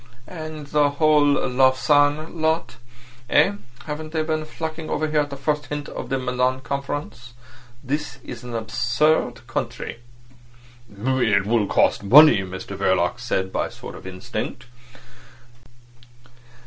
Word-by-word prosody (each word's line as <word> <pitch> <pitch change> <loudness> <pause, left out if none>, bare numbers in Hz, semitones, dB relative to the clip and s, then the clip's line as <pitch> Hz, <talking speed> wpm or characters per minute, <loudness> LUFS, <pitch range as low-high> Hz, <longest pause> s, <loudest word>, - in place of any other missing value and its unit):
"And 155 -3 -7
the 145 0 +2
whole 155 -1 +5 0.2
Lausanne 145 +5 +2
lot—eh? 125 -1 -1 0.3
Haven't 155 +1 -6
they 160 -1 0
been 155 0 -2
flocking 160 0 -6
over 155 - 0
here 155 0 +1
at 145 -1 0
the 140 - -7
first 150 +1 -1
hint 150 -1 -5
of - - -7
the 135 - 0
Milan 125 0 0
Conference? 140 -3 -5 0.5
This 140 -1 -3
is 120 -1 -8
an 120 -1 -6
absurd 120 +2 0
country." 120 -1 -4 0.9
"It 110 -2 +1
will 110 -1 +1
cost - - +2
money," 135 +5 +8
Mr 95 -1 -6
Verloc - - +1
said, 95 0 -2
by - - 0
a - - -13
sort - - -9
of - - -10
instinct. 95 +4 -5
135 Hz, 130 wpm, -23 LUFS, 120-150 Hz, 0.9 s, money